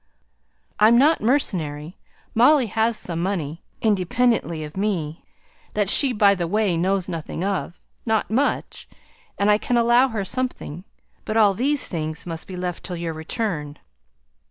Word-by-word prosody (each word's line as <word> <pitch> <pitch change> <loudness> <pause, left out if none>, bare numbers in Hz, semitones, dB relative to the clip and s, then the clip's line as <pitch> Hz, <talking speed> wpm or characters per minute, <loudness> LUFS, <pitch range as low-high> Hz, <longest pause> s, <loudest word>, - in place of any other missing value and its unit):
I'm 220 +3 +6
not 300 +6 +4
mercenary, 175 - -1 0.4
Molly 260 +4 +5
has 225 +1 0
some 170 -2 -3
money 170 -4 -3 0.2
independently 205 -4 +1
of 150 0 -9
me, 180 -6 -2 0.5
that 205 -2 +3
she 275 -3 +5
by 210 -3 +4
the 175 -3 -2
way 205 -1 +1
knows 185 +2 0
nothing 165 -1 -5
of, 195 -3 -3 0.2
not 220 -2 0
much; 270 +6 -1 0.5
and 200 +1 +3
I 210 - +3
can 245 - 0
allow 240 +2 +4
her 220 -6 -3
something. 195 - -4 0.4
But 215 - -2
all 210 -3 +5
these 275 +7 -1
things 155 -2 -5
must 165 -2 -6
be 185 - -7
left 180 -1 -4
till 180 - -5
your 165 -1 -3
return." 160 -3 -4
200 Hz, 150 wpm, -22 LUFS, 170-230 Hz, 0.5 s, I'm